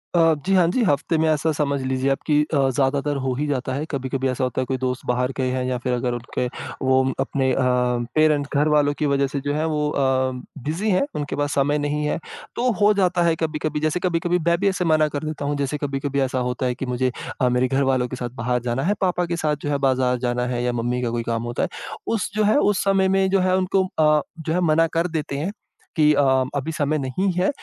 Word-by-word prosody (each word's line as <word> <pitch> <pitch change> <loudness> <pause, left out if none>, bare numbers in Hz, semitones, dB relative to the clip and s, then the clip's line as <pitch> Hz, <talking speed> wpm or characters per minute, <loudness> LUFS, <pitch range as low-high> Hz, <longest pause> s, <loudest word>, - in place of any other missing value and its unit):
अ, 165 -1 +5
जी, 195 - +1
हाँ 175 -2 +5
जी, 245 - +1
हफ्ते 160 -1 +1
में 160 0 +2
ऐसा 155 +1 +1
समझ 140 -2 -1
लीजिए 130 +1 0
आप 135 - 0
कि 150 -1 +3
अ, - - +3 0.2
ज़्यादातर 140 +2 +1
हो 130 -1 0
ही 150 +3 -2
जाता 130 -2 -2
है। 145 +3 -2
कभी-कभी 135 -1 -2
ऐसा 130 0 -2
होता 130 0 -1
है - - -2
कोई 130 0 -2
दोस्त 130 0 -2
बाहर 125 +1 0
के 130 - 0
हैं 130 0 -1
या 125 -1 -1
फिर 125 0 -2
अगर 125 0 -1
उनके 120 +1 -3 0.4
वो 130 0 +3 0.2
अपने 130 -2 0
अ, - - -2 0.6
पेरेंट्स 150 -2 +3
घरवालों 150 0 +3
की 150 - +1
वजह 140 -1 +2
से 140 +1 -3
जो 145 - +1
है 155 +2 0
वो 150 -1 0
अ, 130 -2 +1 0.3
बिज़ी 175 +9 -1
हैं, 185 - +3
उनके 145 0 -3
पास 145 0 -1
समय 145 +2 +2
नहीं 150 +1 -1
है 150 - -1 0.4
तो 250 +1 +1
हो 210 +1 +6
जाता 180 -3 +2
है 165 -1 +3
कभी-कभी 155 -1 -2
जैसे 155 +3 0
कभी-कभी 175 0 +1
मैं 170 0 +4
भी 200 - +3
ऐसे 185 -2 -1
मना 155 -1 +3
कर 145 0 -4
देता 155 -2 -4
हूँ। 145 0 -1
जैसे 140 +1 -1
कभी-कभी 140 -1 -2
ऐसा 130 -1 0
होता 125 +1 -2
है 125 - 0
कि 135 - -4
मुझे 125 0 0 0.3
अ, 125 - +4
मेरे 125 +1 +2
घरवालों 135 -2 +1
के 130 - -6
साथ 120 -1 -4
बाहर 125 +1 0
जाना 125 +3 -1
है, 200 +4 +2
पापा 180 -1 +1
के 170 0 -2
साथ 150 -2 0
जो 145 - -3
है 145 - +1
बाज़ार 125 -1 +1
जाना 125 0 0
है 120 -1 -2
या 125 - +1
मम्मी 120 +1 -1
का 120 - -1
कोई 120 -1 -2
काम 115 0 -2
होता 120 0 -2
है। - - -1 0.5
उस 205 - -2
जो 215 - +2
है 215 +7 +3
उस 205 -7 +2
समय 195 -1 +3
में 190 0 +2
जो 195 0 +3
है 185 0 +2
उनको 190 0 +1
अ, 150 -1 +4 0.2
जो 160 0 -2
है 180 - +1
मना 165 +1 +4
कर 170 +2 +2
देते 155 -4 -3
हैं 170 +7 -2 0.4
कि 150 -2 +5
अ, 145 - +3 0.3
अभी 140 +3 -2
समय 155 0 0
नहीं 150 +8 -1
है 180 +2 +1
145 Hz, 250 wpm, -22 LUFS, 130-160 Hz, 0.6 s, हो